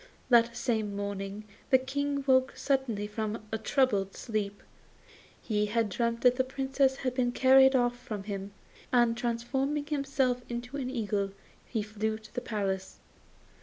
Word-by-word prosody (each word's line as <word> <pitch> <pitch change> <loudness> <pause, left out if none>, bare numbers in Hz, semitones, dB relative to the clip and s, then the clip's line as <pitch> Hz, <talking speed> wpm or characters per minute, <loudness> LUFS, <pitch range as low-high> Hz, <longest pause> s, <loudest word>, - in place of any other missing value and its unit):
That 235 -1 +5
same 220 -5 -1
morning 200 0 -4 0.3
the 260 - +7
King 280 +2 -2
woke 260 -1 +4
suddenly 265 -7 0
from 215 +1 -4
a 220 - -1
troubled 220 -6 +1
sleep. 205 -3 -3 0.8
He 210 -2 0
had 225 0 +1
dreamt 235 +3 -1
that 250 0 +5
the 260 - +3
Princess 265 0 0
was 255 -1 0
being 250 -1 +1
carried 265 +1 +6
off 245 -1 +2
from 210 -5 -6
him, 200 -1 -5 0.4
and, 240 -2 +4
transforming 265 +5 -1
himself 275 -4 0
into 245 +3 -5
an 260 -2 -3
eagle, 205 -5 -1 0.3
he 220 -4 -2
flew 215 +1 -2
to 220 - -16
the 245 - -2
palace. 195 -4 -3
235 Hz, 150 wpm, -30 LUFS, 210-260 Hz, 0.8 s, the